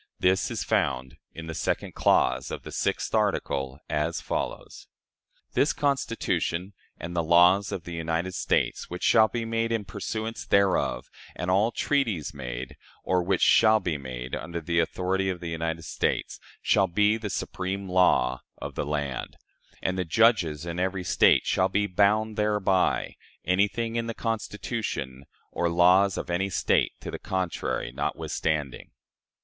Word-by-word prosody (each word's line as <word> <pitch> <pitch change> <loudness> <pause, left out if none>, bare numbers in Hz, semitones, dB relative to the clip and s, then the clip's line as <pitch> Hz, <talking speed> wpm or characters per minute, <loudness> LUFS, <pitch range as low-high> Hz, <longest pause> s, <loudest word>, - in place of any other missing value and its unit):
This 95 0 +2
is - - -3
found 65 +1 -1
in 80 - -8
the 80 - -5
second - - -2
clause 65 0 +2
of - - -6
the - - -8
sixth - - -1
article, 65 0 0
as 85 +2 -1
follows: - - -5 0.7
"This 145 - +2
Constitution, 115 - -1 0.2
and 85 +2 -7
the 85 - +2
laws 90 +4 +5
of 85 - -4
the 85 -1 -7
United 85 +2 -2
States - - 0
which 90 +1 -6
shall 110 -1 +6
be 115 0 -3
made 115 0 -1
in 110 -3 -1
pursuance 110 +4 -4
thereof, 95 -10 +2 0.3
and 90 - -2
all 100 +5 +3
treaties 115 - 0
made, 65 -2 -6 0.3
or 90 -1 +1
which 90 +1 +1
shall 110 -1 +6
be 90 -5 -2
made, 65 -1 -7
under 85 +1 -5
the 85 0 0
authority 95 +3 0
of 90 -2 -3
the 85 - -5
United 80 0 -3
States, - - -2 0.2
shall 95 - +3
be 105 +5 +3
the 110 -2 -4
supreme 95 +1 -3
law 75 -9 +3 0.2
of - - -6
the - - -3
land; 75 -4 -3 0.5
and 90 0 -1
the - - +1
judges 85 -5 +2
in 85 0 -4
every 95 0 -1
State - - +4
shall 95 0 +2
be 100 +2 +1
bound 105 +3 +2
thereby, 105 -3 +1 0.3
anything 105 +6 +1
in 115 0 -1
the 115 - -4
Constitution 105 - -4 0.3
or 85 - 0
laws 90 +3 +4
of - - -4
any 95 +3 0
State 95 - +1
to - - -6
the - - -6
contrary 95 -2 -2
notwithstanding." 75 -4 -2
90 Hz, 155 wpm, -26 LUFS, 80-105 Hz, 0.7 s, shall